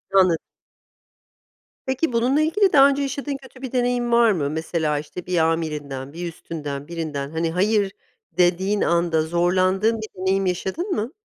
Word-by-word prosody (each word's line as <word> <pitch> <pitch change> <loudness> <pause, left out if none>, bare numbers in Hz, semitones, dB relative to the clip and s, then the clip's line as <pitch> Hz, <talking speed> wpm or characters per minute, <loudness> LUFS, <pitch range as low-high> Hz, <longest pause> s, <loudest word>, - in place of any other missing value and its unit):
Anlad 185 -4 +5 1.5
Peki, 265 +1 0
bununla 250 +6 +2
ilgili 380 +5 +2
daha 275 -1 +8
önce 280 0 0
yaşadığın 280 0 -3
kötü 265 -1 -16
bir 260 -3 -5
deneyim 245 -1 0
var 235 -1 +5
mı? 150 -8 -1
Mesela, 160 -1 -1
işte, 155 +4 -8
bir 180 -1 -1
amirinden, 150 -4 -1
bir 175 +1 -5
üstünden, 145 -4 -6
birinden, 155 -4 -4
hani 165 0 -1
hayır 200 +3 +1 0.5
dediğin 185 +3 +2
anda, 170 -2 +2
zorlandığın 185 +6 +2
bir 220 - -5
deneyim 190 +1 +1
yaşadın 190 - -2
mı? 225 -1 -1
185 Hz, 150 wpm, -22 LUFS, 160-240 Hz, 1.5 s, daha